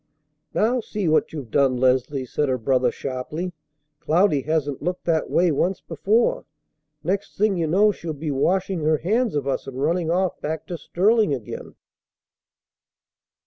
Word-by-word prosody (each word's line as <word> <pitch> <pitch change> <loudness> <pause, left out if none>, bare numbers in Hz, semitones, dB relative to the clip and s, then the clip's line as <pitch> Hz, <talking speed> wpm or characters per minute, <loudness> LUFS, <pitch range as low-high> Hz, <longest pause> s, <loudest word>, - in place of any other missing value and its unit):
"Now 240 +4 +2
see 210 -4 -3
what 155 0 +2
you've 140 -8 -7
done, 135 -3 +3
Leslie!" 130 +1 +1
said 145 +3 -1
her 130 - +1
brother 125 +2 +2
sharply. 150 +7 -4 0.5
"Cloudy 165 -3 +2
hasn't 145 -2 -1
looked 180 +3 -3
that 160 -2 +1
way 175 -1 +3
once 180 +6 0
before. 205 +8 +1 0.6
Next 195 +4 -2
thing 210 -1 +2
you 165 -2 0
know 200 +6 +4
she'll 170 -4 -6
be 150 +1 -4
washing 185 +6 +1
her 155 0 +2
hands 220 - 0
of 140 -2 -1
us 135 - -2
and 130 -1 -6
running 165 +3 0
off 185 +2 0
back 155 +1 -3
to 175 - -3
Sterling 200 +1 +2
again." 115 -6 -8
160 Hz, 155 wpm, -23 LUFS, 140-190 Hz, 0.6 s, know